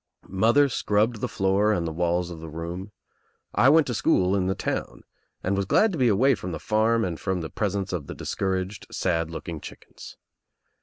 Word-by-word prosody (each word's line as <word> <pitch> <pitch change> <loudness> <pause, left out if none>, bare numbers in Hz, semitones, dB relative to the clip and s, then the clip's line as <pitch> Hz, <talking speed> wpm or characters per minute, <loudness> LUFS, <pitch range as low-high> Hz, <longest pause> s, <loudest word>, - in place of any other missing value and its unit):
Mother 115 +9 +3
scrubbed 110 -2 0
the 125 - 0
floor 100 -1 +1
and 85 -5 0
the 80 - -2
walls 85 +1 0
of 85 - -8
the 80 0 -8
room, 85 +5 -6 0.6
I 120 +6 +5
went 155 +1 +5
to 125 - -3
school 95 -3 +2
in 95 -2 0
the 95 - 0
town - - -4 0.4
and 95 +2 0
was 100 -1 -1
glad 220 - +4
to 165 - -4
be 125 - +4
away 120 +6 +4
from 90 -6 -5
the 80 - -4
farm 110 +4 +2
and 85 -3 -4
from 95 -2 -2
the 80 - -6
presence 100 -2 -2
of 80 -6 -3
the - - -7
discouraged, 95 +1 -3
sad 85 -3 -1
looking 80 -1 -6
chickens. - - -12
95 Hz, 200 wpm, -25 LUFS, 85-110 Hz, 0.6 s, I